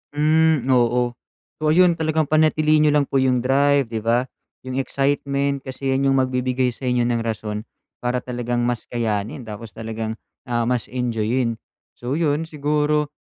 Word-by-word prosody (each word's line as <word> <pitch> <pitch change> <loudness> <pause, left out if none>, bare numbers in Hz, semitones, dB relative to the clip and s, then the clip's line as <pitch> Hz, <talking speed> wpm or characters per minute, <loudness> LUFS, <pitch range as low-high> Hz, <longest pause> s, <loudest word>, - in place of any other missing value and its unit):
Hmm, 155 -1 +3
oo. 120 0 +3 0.5
So, 155 - -1
ayun 175 0 +5
talagang 155 -1 0
panatilihin 155 0 +4
n'yo - - +4
lang 145 -1 +3
po 135 - +1
yung 130 -2 +2
drive, 140 0 +3
di 110 - -2
ba, 115 +3 +1 0.4
yung 130 +1 -3
excitement, 140 0 0
kasi 135 0 -4
'yan 135 +1 +1
yung 135 - +3
magbibigay 130 0 0
sa 130 +2 -7
inyo 125 -1 +2
ng 120 -1 0
rason 110 -1 -4 0.3
para 125 +1 -1
talagang 120 -1 -2
mas 120 -1 -1
kayanin 115 +3 -2
tapos 105 -2 -9
talagang, 110 0 -4 0.3
ah, 120 -1 0
mas 125 -2 0
enjoyin, 120 -1 -1 0.4
so 120 +2 -4
yun 155 -1 0
siguro, 150 0 0
130 Hz, 160 wpm, -22 LUFS, 120-145 Hz, 0.5 s, ayun